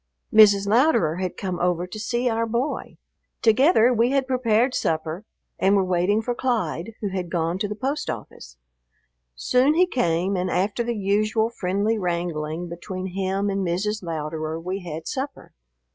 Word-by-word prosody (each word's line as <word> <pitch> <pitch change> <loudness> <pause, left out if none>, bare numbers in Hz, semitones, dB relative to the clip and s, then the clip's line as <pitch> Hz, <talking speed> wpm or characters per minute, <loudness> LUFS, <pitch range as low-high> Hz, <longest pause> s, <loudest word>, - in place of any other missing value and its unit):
Mrs. 205 -2 +7
Louderer 210 - +3
had 185 -1 -3
come 185 -3 -3
over 180 0 0
to 180 +4 -8
see 240 +3 -1
our 230 -1 0
boy. 240 +6 -3 0.5
Together 250 +1 +5
we 235 +1 +3
had 275 0 +1
prepared 250 -1 +2
supper 160 +3 -2 0.3
and 195 +1 +4
were 195 - +3
waiting 185 +4 +1
for 245 - -1
Clyde, 225 -6 -2
who 205 - -1
had 185 -2 -4
gone 170 +1 -1
to 205 - -1
the 210 - -5
post 270 +7 -3
office. 60 0 -8 0.8
Soon 255 - +2
he 360 +2 +5
came, 190 - 0
and 180 0 -1
after 200 +6 0
the 235 -1 -2
usual 215 +3 +1
friendly 205 +2 -1
wrangling 170 -2 -2
between 185 +2 -6
him 195 +1 -1
and 195 0 -1
Mrs. 200 +5 -1
Louderer 160 -1 -4
we 185 +4 -4
had 165 -3 -7
supper. 275 +1 -5
195 Hz, 160 wpm, -24 LUFS, 175-230 Hz, 0.8 s, Mrs